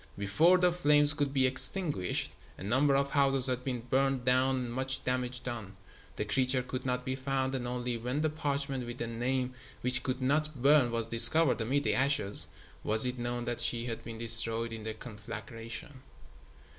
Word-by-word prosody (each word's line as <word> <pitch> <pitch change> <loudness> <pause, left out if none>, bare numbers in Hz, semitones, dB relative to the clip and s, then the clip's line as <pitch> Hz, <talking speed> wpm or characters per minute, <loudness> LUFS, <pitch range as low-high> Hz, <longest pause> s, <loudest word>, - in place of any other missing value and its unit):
Before 155 - +3
the 180 0 +2
flames 150 -4 +3
could 145 -2 -2
be 135 -2 +2
extinguished, 130 - 0 0.3
a - - -10
number 135 +7 +2
of 140 0 0
houses 135 -2 +6
had 125 -1 +5
been 125 -3 -4
burned 130 +1 -1
down 130 +1 +2
and 125 -2 -4
much 130 +1 -2
damage 125 0 -3
done. 110 -6 -6 0.4
The - - -3
creature 130 -1 0
could 130 +1 -6
not 125 0 -2
be 130 - -2
found, 135 0 -2
and 125 -2 -3
only 125 -1 -3
when 125 +5 -3
the 155 - +1
parchment 140 -4 -3
with 120 +1 -7
the 120 - -3
Name, 125 +2 -2 0.3
which 125 0 +1
could 130 0 -3
not 150 +2 -1
burn, 140 -1 +4
was 115 -1 -1
discovered 125 +2 +6
amid 135 +6 0
the - - 0
ashes, 130 -7 +1 0.4
was 110 +2 +2
it 125 0 -4
known 120 0 -3
that 120 0 -3
she 120 0 0
had 115 -2 -6
been 115 -1 -8
destroyed 115 0 -1
in 110 -1 -8
the 110 -1 -4
conflagration. 115 +3 -9
125 Hz, 185 wpm, -30 LUFS, 120-135 Hz, 0.4 s, houses